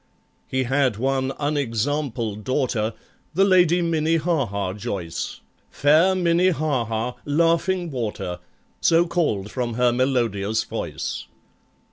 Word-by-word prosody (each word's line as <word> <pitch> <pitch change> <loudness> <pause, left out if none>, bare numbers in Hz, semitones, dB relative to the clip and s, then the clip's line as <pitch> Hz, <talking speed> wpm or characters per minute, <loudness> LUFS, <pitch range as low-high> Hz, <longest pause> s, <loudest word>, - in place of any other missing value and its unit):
He 130 0 0
had 130 -3 +1
one 135 +2 0
unexampled 130 -5 -1
daughter, 120 -4 0 0.4
The 195 +2 +5
LADY 180 -2 +4
MINNIE 165 -1 +1
HAHA 125 - -1
JOYCE, 95 -4 -5 0.3
Fair 160 +6 +4
MINNIE 175 0 +3
HAHA, 125 -7 -1
"Laughing 170 +3 +1
Water," 105 -8 -4 0.4
So 165 +1 +4
called 145 - -1
from 120 -3 -2
her 125 0 +3
melodious 115 -5 0
voice. - - -4
135 Hz, 105 wpm, -23 LUFS, 115-165 Hz, 0.4 s, The